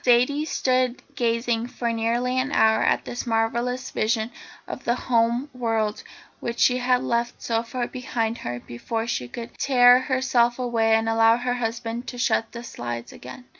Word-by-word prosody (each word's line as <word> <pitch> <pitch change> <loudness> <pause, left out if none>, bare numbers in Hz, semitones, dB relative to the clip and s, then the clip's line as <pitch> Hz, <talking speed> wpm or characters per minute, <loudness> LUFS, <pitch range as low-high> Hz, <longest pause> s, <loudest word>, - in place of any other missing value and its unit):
Zaidie 255 +5 +3
stood 255 -3 +1 0.2
gazing 230 -1 0
for 235 -1 -3
nearly 240 +3 0
an 270 +2 -1
hour 220 -4 +4
at - - +1
this 245 +1 -5
marvellous 235 +3 -1
vision 220 +1 0 0.4
of - - -7
the 240 - +1
home 235 +2 +1
world 225 -4 -1 0.4
which 235 0 -4
she 250 - +4
had 250 0 +2
left 235 0 -1
so 230 -1 0
far 240 +1 -3
behind 235 -2 -3
her 120 0 -4
before 225 - -4
she 125 - -2
could 235 - -8
tear 250 -2 +6
herself 255 -2 +1
away 230 -3 +2
and 225 0 +1
allow 225 0 +4
her 245 0 -1
husband 235 0 -3
to 245 - -6
shut 225 -2 +1
the 235 0 -8
slides 120 - -6
again. 250 - -11
235 Hz, 170 wpm, -24 LUFS, 225-250 Hz, 0.4 s, tear